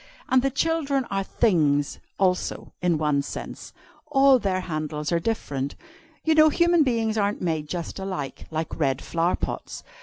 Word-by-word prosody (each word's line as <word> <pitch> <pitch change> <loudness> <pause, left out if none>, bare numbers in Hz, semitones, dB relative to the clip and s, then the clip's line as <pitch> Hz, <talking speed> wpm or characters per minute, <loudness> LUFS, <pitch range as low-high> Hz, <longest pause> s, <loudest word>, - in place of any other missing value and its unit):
And 260 0 +5
the 275 - +1
children 280 -1 0
are 195 0 0
'things,' 150 -10 +1 0.2
also, 185 -2 0
in 175 -2 +2
one 150 -2 +1
sense. 140 - -7 0.4
All 275 -2 +5
their 190 -4 0
handles 155 -3 -3
are 170 - +2
different. 145 -9 -2 0.5
You 320 - +4
know 310 0 +7
human 340 +2 +3
beings 225 -5 +1
aren't 205 0 0
made 160 -4 -2
just 175 +1 -4
alike, 185 -8 -5
like 160 +1 -4
red 135 -3 +1
flower 170 +1 0
pots. - - -5
185 Hz, 155 wpm, -25 LUFS, 155-260 Hz, 0.5 s, know